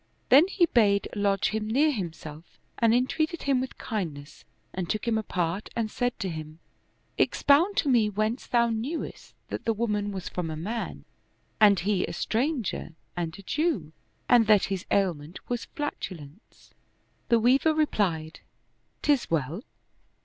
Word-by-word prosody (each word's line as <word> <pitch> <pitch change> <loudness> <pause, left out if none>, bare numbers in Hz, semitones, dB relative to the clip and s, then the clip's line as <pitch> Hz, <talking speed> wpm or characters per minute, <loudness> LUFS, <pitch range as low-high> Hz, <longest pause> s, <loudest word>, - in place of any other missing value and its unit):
Then 285 +7 +7
he 385 -2 +3
bade 205 -9 +3
lodge 200 -1 +1
him 215 0 -2
near 285 +8 +3
himself 165 - -7 0.2
and 230 -1 +4
entreated 310 +8 0
him 270 -2 +2
with 260 - -6
kindness 155 - -5 0.3
and 180 -2 -4
took 215 +2 -2
him 230 - +2
apart 185 -3 -2
and 225 -2 -1
said 245 -1 -1
to 195 - -1
him, 155 -1 -7 0.3
" - - -42
Expound 335 +8 +3
to - - +2
me 235 -5 +4
whence 215 +4 -2
thou 235 -1 +2
knewest 245 +9 -5
that - - -5
the 225 - +1
woman 210 -2 -1
was 190 -2 -5
from 175 -3 -3
a 155 - -4
man, 215 +9 -5 0.5
and 205 -4 +6
he 195 0 +1
a - - -6
stranger 235 - -2 0.2
and 170 -1 -3
a 200 - -12
Jew, 220 - -1 0.3
and 235 -3 +5
that 210 -3 +5
his 185 - -5
ailment 175 -5 0
was 245 -1 -3
flatulence? 185 - -7 0.3
" - - -41
The 235 - +5
Weaver 270 +7 +3
replied, 180 - 0 0.3
" - - -45
'Tis 285 -4 +2
well. 165 - -1
215 Hz, 160 wpm, -27 LUFS, 175-245 Hz, 0.5 s, Then